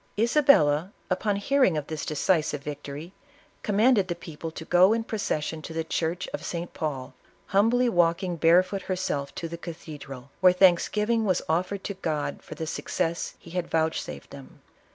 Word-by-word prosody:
Isabella, 205 Hz, -, +4 dB, 0.2 s
upon 200 Hz, +3 st, +1 dB
hearing 230 Hz, -, +2 dB
of 150 Hz, -, -3 dB
this 155 Hz, 0 st, -5 dB
decisive 155 Hz, -1 st, 0 dB
victory, 145 Hz, +4 st, -7 dB, 0.5 s
com 205 Hz, -2 st, -1 dB
manded 220 Hz, -4 st, +4 dB
the 175 Hz, -, -2 dB
people 165 Hz, -1 st, -7 dB
to 160 Hz, 0 st, -9 dB
go 180 Hz, +5 st, +5 dB
in 230 Hz, 0 st, 0 dB
procession 160 Hz, -8 st, -2 dB
to 160 Hz, -, -8 dB
the 165 Hz, 0 st, -1 dB
church 165 Hz, +2 st, -2 dB
of -, -, -6 dB
St. 170 Hz, 0 st, -5 dB
Paul, 140 Hz, -5 st, -4 dB, 0.3 s
humbly 230 Hz, +6 st, +3 dB
walking 175 Hz, -2 st, +2 dB
barefoot 180 Hz, +4 st, +3 dB
herself 165 Hz, -7 st, -3 dB
to 165 Hz, -, -4 dB
the 170 Hz, +1 st, -7 dB
cathedral, 145 Hz, -6 st, -9 dB
where 180 Hz, 0 st, +6 dB
thanksgiving 210 Hz, +5 st, +3 dB
was 185 Hz, -3 st, +1 dB
oftered 185 Hz, +5 st, -1 dB
to 200 Hz, -, -3 dB
God 150 Hz, -6 st, -3 dB
for -, -, -10 dB
'iccess 165 Hz, +1 st, -3 dB
he 170 Hz, -, -14 dB
hud 180 Hz, -1 st, -2 dB
vouchsafed 160 Hz, -, -2 dB
them. 65 Hz, -2 st, -12 dB
170 Hz, 160 wpm, -26 LUFS, 155-195 Hz, 0.5 s, where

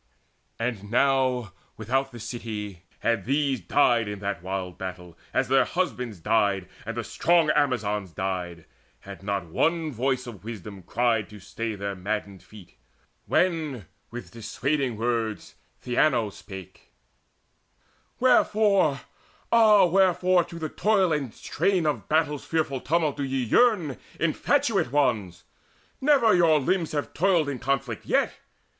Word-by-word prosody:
And 115 Hz, -4 st, -3 dB
now 125 Hz, -4 st, +2 dB, 0.2 s
without 135 Hz, +5 st, -1 dB
the 120 Hz, -, -10 dB
city 105 Hz, -6 st, -6 dB, 0.2 s
these 130 Hz, +5 st, +1 dB
had 90 Hz, -, -23 dB
died 120 Hz, -6 st, +3 dB
In 105 Hz, 0 st, -4 dB
that 100 Hz, -4 st, -4 dB
wild 95 Hz, 0 st, -5 dB
battle, 90 Hz, -2 st, -7 dB, 0.2 s
as -, -, +1 dB
their 135 Hz, 0 st, +4 dB
husbands 125 Hz, -, -3 dB
died 100 Hz, -1 st, +1 dB, 0.2 s
And 115 Hz, 0 st, -4 dB
the 120 Hz, -, -2 dB
strong 165 Hz, +5 st, +2 dB
Amazons 105 Hz, -, 0 dB
died, 90 Hz, -2 st, -4 dB, 0.4 s
had 100 Hz, -1 st, -10 dB
not 100 Hz, -2 st, -2 dB
one 160 Hz, -, 0 dB
voice 130 Hz, +1 st, -1 dB
Of 105 Hz, -7 st, -10 dB
wisdom 105 Hz, -3 st, -8 dB
cried 115 Hz, +2 st, 0 dB
to 105 Hz, -1 st, -11 dB
stay 110 Hz, +3 st, -5 dB
their 100 Hz, 0 st, -4 dB
maddened 100 Hz, 0 st, -4 dB
feet, 100 Hz, -, -16 dB, 0.5 s
When 155 Hz, -, 0 dB, 0.2 s
with 120 Hz, +1 st, -8 dB
dissuading 125 Hz, +2 st, -2 dB
words 115 Hz, -2 st, -2 dB, 0.3 s
Theano 120 Hz, -3 st, +2 dB
spake: 95 Hz, -2 st, -11 dB, 1.3 s
"Wherefore, 210 Hz, -, +3 dB, 0.5 s
ah 215 Hz, -4 st, +6 dB
wherefore 185 Hz, 0 st, +3 dB
for 170 Hz, -, -11 dB
the 160 Hz, -2 st, -3 dB
toil 195 Hz, -4 st, +2 dB
and 140 Hz, -6 st, -2 dB
strain 185 Hz, -, 0 dB
Of 150 Hz, -1 st, -2 dB
battle's 150 Hz, -2 st, +1 dB
fearful 150 Hz, -5 st, -1 dB
tumult 155 Hz, -1 st, 0 dB
do 140 Hz, -, -2 dB
ye 135 Hz, -1 st, -1 dB
yearn, 165 Hz, -, +3 dB, 0.2 s
Infatuate 125 Hz, -, +1 dB
ones? 105 Hz, -12 st, 0 dB, 0.6 s
Never 265 Hz, -6 st, +4 dB
your 165 Hz, -4 st, +5 dB
limbs 165 Hz, +3 st, 0 dB
have 145 Hz, -1 st, -3 dB
toiled 175 Hz, -2 st, +2 dB
In 140 Hz, -3 st, -3 dB
conflict 125 Hz, -5 st, -2 dB
yet. -, -, +2 dB
125 Hz, 135 wpm, -26 LUFS, 105-155 Hz, 1.3 s, ah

